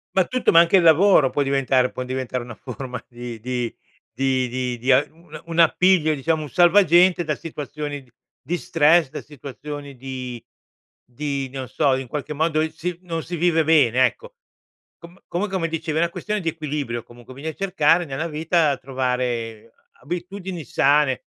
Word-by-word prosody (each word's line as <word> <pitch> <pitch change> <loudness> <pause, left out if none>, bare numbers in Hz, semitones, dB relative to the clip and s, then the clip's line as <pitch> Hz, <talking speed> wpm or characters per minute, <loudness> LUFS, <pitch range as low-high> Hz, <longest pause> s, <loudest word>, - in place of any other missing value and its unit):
Ma 190 -2 +4
tutto, 255 +4 +1
ma 165 - +7
anche 170 +3 +5
il 180 - +3
lavoro 165 -3 +5
può 145 - 0
diventare 135 -2 +1
può 130 - -5
diventare 130 -1 -3
una 120 -1 -9
forma 125 0 -7
di 120 -2 -8
di 125 0 -3 0.4
di 130 -2 -1
di 130 +4 +1
a 135 +3 +5
una 165 +2 -13
un 165 0 -3
appiglio, 170 -1 +4
diciamo, 155 +3 -1
un 150 - -8
salvagente 175 0 +5
da 150 -1 -2
situazioni 150 -2 -6
d 125 - -26 0.3
di 175 - -2
stress, 160 +1 +3
da - - -7
situazioni 145 0 -9
di 125 -2 -7 0.6
di 140 +1 -4
non 130 -1 -6
so, 140 +1 +1
in 130 -1 -5
qualche 150 +3 -5
modo, 155 +1 +1
si 175 0 -5
non 165 -2 -3
si 175 - -5
vive 165 -1 +2
bene, 130 -6 +4
ecco. 485 - -4 0.7
Com 170 +2 -14
comunq 190 +3 -3
mi 170 -3 0
dicevi 160 -1 -3
è - - +2
una 170 - +2
questione 210 +3 -3
di 165 - -1
equilibrio, 145 -7 -4
comunque, 120 +1 -14
bisogna 155 +3 -5
cercare 175 -3 +2
nella 140 +2 -4
vita, 160 -1 +1
trovare 125 -4 -3 0.2
a - - -30
abitudini 180 +1 -5
sane, 140 +1 +2
150 Hz, 170 wpm, -22 LUFS, 130-170 Hz, 0.7 s, ma